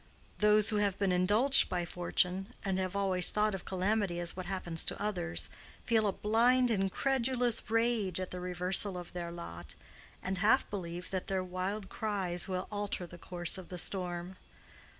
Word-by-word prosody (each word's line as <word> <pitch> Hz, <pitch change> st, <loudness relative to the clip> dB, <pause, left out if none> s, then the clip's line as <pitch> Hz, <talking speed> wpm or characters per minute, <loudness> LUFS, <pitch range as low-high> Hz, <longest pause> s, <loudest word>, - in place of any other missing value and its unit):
Those 210 Hz, 0 st, +5 dB
who 215 Hz, -, +1 dB
have 200 Hz, -2 st, +1 dB
been 200 Hz, -2 st, +1 dB
indulged 210 Hz, +10 st, +4 dB
by 175 Hz, -1 st, -1 dB
fortune 180 Hz, +2 st, -1 dB
and 190 Hz, -1 st, 0 dB
have 185 Hz, 0 st, -2 dB
always 190 Hz, -2 st, +3 dB
thought 210 Hz, 0 st, +1 dB
of 190 Hz, -, -6 dB
calamity 190 Hz, -1 st, 0 dB
as 175 Hz, -1 st, +1 dB
what 185 Hz, -1 st, -6 dB
happens 175 Hz, -4 st, -3 dB
to -, -, -2 dB
others, 85 Hz, -, -1 dB, 0.4 s
feel 220 Hz, -2 st, +3 dB
a -, -, +2 dB
blind 240 Hz, +5 st, +3 dB
incredulous 240 Hz, +4 st, 0 dB
rage 225 Hz, -5 st, +1 dB
at 185 Hz, -, -4 dB
the 180 Hz, -, -5 dB
reversal 180 Hz, +2 st, +1 dB
of 175 Hz, -1 st, -8 dB
their 170 Hz, -1 st, -5 dB
lot, 85 Hz, -, -8 dB, 0.5 s
and 190 Hz, 0 st, -2 dB
half 220 Hz, +6 st, +4 dB
believe 175 Hz, -3 st, -5 dB
that 185 Hz, -1 st, -3 dB
their 190 Hz, -1 st, -1 dB
wild 185 Hz, +3 st, -4 dB
cries 190 Hz, -5 st, -1 dB
will 185 Hz, -1 st, -3 dB
alter 205 Hz, -3 st, -3 dB
the 175 Hz, 0 st, -12 dB
course 175 Hz, +1 st, +1 dB
of 185 Hz, -, -11 dB
the 180 Hz, -, -6 dB
storm. 180 Hz, 0 st, -1 dB
190 Hz, 170 wpm, -32 LUFS, 180-210 Hz, 0.5 s, Those